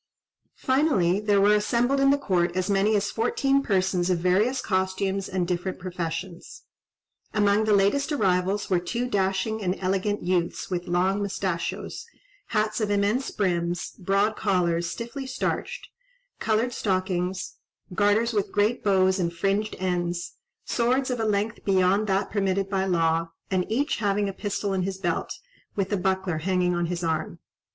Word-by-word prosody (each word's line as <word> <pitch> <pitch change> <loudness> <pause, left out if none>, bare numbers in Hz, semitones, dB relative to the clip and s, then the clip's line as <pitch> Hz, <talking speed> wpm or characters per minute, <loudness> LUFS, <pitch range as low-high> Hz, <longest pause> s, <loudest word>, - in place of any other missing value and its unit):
Finally 260 - +2
there 210 -1 +2
were 205 +1 +5
assembled 240 +6 +2
in 275 0 +4
the 280 - +4
court 180 -9 0
as 185 +2 0
many 200 +2 +3
as 205 0 0
fourteen 275 +4 +1
persons 190 -5 +1
of 180 - +2
various 195 +9 +2
costumes 190 -1 -1
and 185 -2 -1
different 180 +1 -2
professions. 175 -1 -6 0.7
Among 205 0 +3
the 215 - +3
latest 205 +10 +2
arrivals 195 -5 +1
were 185 -2 +2
two 235 +8 -2
dashing 200 +1 0
and 185 -1 -1
elegant 195 +2 -1
youths 175 0 -1
with 175 -1 -2
long 185 +3 +1
moustachios, 190 -3 -3 0.4
hats 215 0 0
of 210 - 0
immense 205 +6 +1
brims, 175 -3 -1
broad 200 +3 0
collars, 175 -5 +1
stiffly 240 +7 -6
starched, 485 - -3 0.5
coloured 225 +3 +1
stockings, 185 -2 -2 0.4
garters 210 +4 +2
with 205 -2 -1
great 210 +4 +1
bows 190 -1 +3
and 170 -2 0
fringed 195 +5 -1
ends, 175 -1 -2 0.3
swords 255 +2 +1
of 245 - -2
a 225 - 0
length 210 +2 -1
beyond 195 +2 +2
that 195 +1 0
permitted 195 -1 0
by 190 -1 +1
law, 165 -2 +1 0.2
and 185 +1 0
each 280 +7 0
having 205 -1 0
a 195 - -3
pistol 200 0 -2
in 190 - 0
his 190 +1 -3
belt, 175 -4 -2 0.4
with 195 0 -1
a - - +2
buckler 190 -3 -1
hanging 180 +1 +1
on 175 -1 0
his 175 0 -3
arm. 160 -1 -2
195 Hz, 155 wpm, -25 LUFS, 180-215 Hz, 0.7 s, were